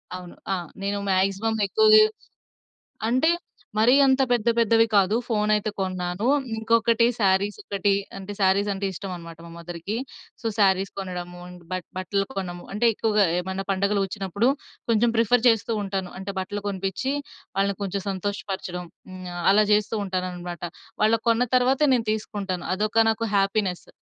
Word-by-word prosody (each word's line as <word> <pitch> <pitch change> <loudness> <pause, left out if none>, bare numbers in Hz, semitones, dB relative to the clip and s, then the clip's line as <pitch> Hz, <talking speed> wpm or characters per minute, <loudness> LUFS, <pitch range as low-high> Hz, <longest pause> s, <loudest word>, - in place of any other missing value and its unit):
అవును. 180 -1 -9 0.2
ఆ! - - +2 0.3
నేను 200 +1 -1
మాక్సిమం 195 +4 +1
ఎక్కువ 435 - +3 1.2
అంటే, 255 +7 +3 0.5
మరీ 225 +4 +5
అంత 265 0 +4
పెద్ద 240 -2 +1
పెద్దవి 225 0 +4
కాదు, 200 +1 +4
ఫోను 215 -2 +1
అయితే 210 +1 -1
కొన్నాను. 185 +1 -2 0.3
ఇంకొకటి 230 +1 +3
సారీస్ 200 0 +2
ఒకటి, 200 0 0 0.2
అంటే 195 +1 -7
సారీస్ 195 +2 +3
అంటే 195 +1 -3
ఇష్టమన్నమాట 170 -3 -7
మా 170 - -11
మదర్‌కి. 170 +4 -5 0.5
సో - - -13
సారీస్ 195 -1 +3
కొనడము, 180 -2 -6 0.3
బట్ 185 -2 -3
బట్టలు 195 +2 -1
కొనము 175 -2 -5
అంటే, 210 +4 0
ఎక్కువగా 210 -1 +2
ఏమన్నా 190 +2 -4
పండుగలు 200 +1 +1
వచ్చినప్పుడు, 200 +4 0 0.4
కొంచెం 230 +1 +3
ప్రిఫర్ 230 +2 +3
చేస్తూంటాను. 205 -4 -1
అంటే 195 +1 -5
బట్టలు 205 +2 -4
కొనిపిచ్చి 195 +7 -2 0.4
వాళ్ళని 200 0 +1
కొంచెం 195 0 -3
సంతోషపరచడం. 190 -2 -4 0.2
హ్మ్. 185 0 -9
ఆహ్, 175 - -4
అలా 210 +2 +5
చేస్తూంటానన్నమాట. 185 -4 -2 0.4
వాళ్ళకు 225 +2 +2
కొన్న 230 +2 +2
తర్వాతే 265 +4 +3
నేను 230 -3 -2
తీసుకుంటాను. 200 -4 -4
అదొక 215 +3 +2
నాకు 225 +1 -2
హ్యాపీనెస్. 195 -2 0
200 Hz, 135 wpm, -24 LUFS, 185-220 Hz, 1.2 s, మరీ